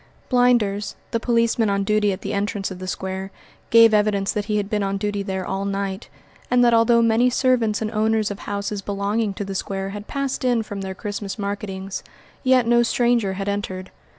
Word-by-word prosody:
Blinders, 240 Hz, -5 st, +2 dB, 0.2 s
the 230 Hz, -, 0 dB
policeman 230 Hz, -2 st, +2 dB
on 200 Hz, 0 st, +1 dB
duty 210 Hz, 0 st, +2 dB
at 190 Hz, +1 st, -5 dB
the -, -, -4 dB
entrance 200 Hz, -1 st, -2 dB
of 185 Hz, -, -7 dB
the 185 Hz, -, -6 dB
square, 190 Hz, +1 st, -4 dB, 0.4 s
gave 230 Hz, -1 st, +7 dB
evidence 210 Hz, -2 st, +2 dB
that 210 Hz, -1 st, -2 dB
he 210 Hz, 0 st, 0 dB
had 205 Hz, -1 st, -1 dB
been 210 Hz, -1 st, -1 dB
on 195 Hz, 0 st, -1 dB
duty 205 Hz, 0 st, -2 dB
there 190 Hz, -2 st, -3 dB
all 195 Hz, -, -2 dB
night, 195 Hz, 0 st, -3 dB, 0.4 s
and 250 Hz, 0 st, +4 dB
that 235 Hz, -, +4 dB
although 230 Hz, +1 st, +5 dB
many 230 Hz, +2 st, +4 dB
servants 240 Hz, -4 st, +1 dB
and 215 Hz, -, -3 dB
owners 220 Hz, -1 st, +1 dB
of 200 Hz, -, -6 dB
houses 200 Hz, 0 st, -3 dB
belonging 205 Hz, +2 st, -1 dB
to 200 Hz, +1 st, -5 dB
the 195 Hz, -, -5 dB
square 195 Hz, 0 st, -3 dB
had 205 Hz, +1 st, -7 dB
passed 275 Hz, -1 st, -3 dB
in 245 Hz, -3 st, +2 dB
from 205 Hz, -2 st, -6 dB
their 190 Hz, -1 st, -5 dB
Christmas 205 Hz, 0 st, -5 dB
marketings, 200 Hz, -2 st, -4 dB, 0.4 s
yet 255 Hz, -2 st, +4 dB
no 240 Hz, +1 st, +4 dB
stranger 235 Hz, -4 st, +2 dB
had 195 Hz, +1 st, -4 dB
entered. 190 Hz, -2 st, -3 dB
205 Hz, 200 wpm, -22 LUFS, 195-230 Hz, 0.4 s, gave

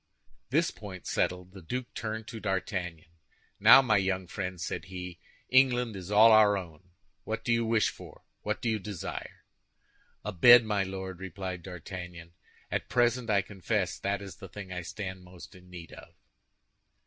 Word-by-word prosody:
This 160 Hz, +5 st, +2 dB
point, 95 Hz, -4 st, -10 dB
settled, 90 Hz, 0 st, -1 dB
the 95 Hz, 0 st, -12 dB
duke 120 Hz, +9 st, -5 dB
turned 110 Hz, 0 st, -4 dB
to 115 Hz, -, -7 dB
D'Artagnan. 95 Hz, -5 st, -3 dB, 0.5 s
"Now, 135 Hz, -, +9 dB
my 110 Hz, -4 st, +3 dB
young 95 Hz, -1 st, 0 dB
friend," 90 Hz, 0 st, -5 dB
said 85 Hz, -, -4 dB
he, 90 Hz, -1 st, -8 dB, 0.3 s
"England 125 Hz, -4 st, +3 dB
is 95 Hz, -1 st, -8 dB
all 110 Hz, +2 st, +7 dB
our 105 Hz, -2 st, +6 dB
own. 90 Hz, -1 st, -9 dB, 0.3 s
What 110 Hz, 0 st, -4 dB
do 120 Hz, -, +2 dB
you 115 Hz, 0 st, +2 dB
wish 110 Hz, -2 st, +2 dB
for? -, -, -13 dB, 0.2 s
What -, -, -3 dB
do -, -, 0 dB
you 110 Hz, -1 st, +1 dB
desire?" 100 Hz, -3 st, -7 dB, 0.8 s
"A 105 Hz, -, -2 dB
bed, 120 Hz, +6 st, +8 dB
my 105 Hz, -2 st, 0 dB
Lord," 95 Hz, -1 st, -5 dB
replied 95 Hz, -1 st, -6 dB
D'Artagnan. 90 Hz, -1 st, -8 dB, 0.4 s
"At -, -, -2 dB
present, 120 Hz, -1 st, +2 dB
I 100 Hz, -2 st, +3 dB
confess, 95 Hz, 0 st, -2 dB
that 100 Hz, 0 st, -2 dB
is 95 Hz, -3 st, -9 dB
the 95 Hz, -4 st, -10 dB
thing 95 Hz, 0 st, -8 dB
I 90 Hz, -, -4 dB
stand 95 Hz, 0 st, -6 dB
most 90 Hz, +2 st, -13 dB
in 90 Hz, -1 st, -16 dB
need 85 Hz, -2 st, -10 dB
of." -, -, -13 dB
95 Hz, 170 wpm, -29 LUFS, 90-110 Hz, 0.8 s, Now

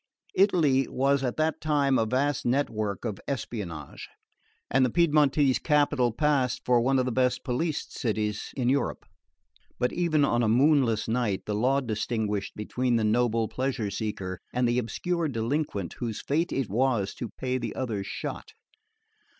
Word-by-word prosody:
Italy 155 Hz, -9 st, +3 dB
was 135 Hz, +1 st, +1 dB
at 125 Hz, -2 st, -2 dB
that 155 Hz, 0 st, 0 dB
time 145 Hz, -3 st, +2 dB
a 110 Hz, -, +1 dB
vast 135 Hz, +4 st, 0 dB
network 110 Hz, -6 st, -1 dB
of 105 Hz, -4 st, -3 dB
espionage, 100 Hz, -, -5 dB, 0.6 s
and 135 Hz, -, +3 dB
the 125 Hz, -, +3 dB
Piedmontese 145 Hz, -3 st, +3 dB
capital 145 Hz, -5 st, +2 dB
passed 135 Hz, -1 st, 0 dB
for 125 Hz, -1 st, +4 dB
one 135 Hz, +3 st, +2 dB
of 130 Hz, -, +2 dB
the 125 Hz, -, -1 dB
best 125 Hz, +1 st, +1 dB
policed 150 Hz, +5 st, -2 dB
cities 105 Hz, -4 st, -2 dB
in 125 Hz, -2 st, 0 dB
Europe; 135 Hz, +2 st, 0 dB, 0.7 s
but 125 Hz, 0 st, 0 dB
even 160 Hz, -4 st, +2 dB
on 120 Hz, -3 st, +1 dB
a 110 Hz, -, +2 dB
moonless 125 Hz, -2 st, +3 dB
night 110 Hz, -4 st, -1 dB
the 105 Hz, -, -2 dB
law 130 Hz, +6 st, +2 dB
distinguished 110 Hz, -3 st, -2 dB
between 125 Hz, +3 st, -1 dB
the 115 Hz, -, +1 dB
noble 115 Hz, 0 st, +2 dB
pleasure 125 Hz, -6 st, -2 dB
seeker 95 Hz, -3 st, -4 dB
and 125 Hz, 0 st, +1 dB
the 120 Hz, +1 st, +2 dB
obscure 170 Hz, +8 st, -2 dB
delinquent 115 Hz, -, -2 dB
whose 115 Hz, -3 st, -3 dB
fate 165 Hz, +5 st, -1 dB
it 135 Hz, -4 st, -1 dB
was 115 Hz, -2 st, 0 dB
to 120 Hz, -, -6 dB
pay 130 Hz, 0 st, -3 dB
the -, -, -4 dB
other's 110 Hz, -7 st, -3 dB
shot. -, -, -6 dB
125 Hz, 160 wpm, -27 LUFS, 110-140 Hz, 0.7 s, for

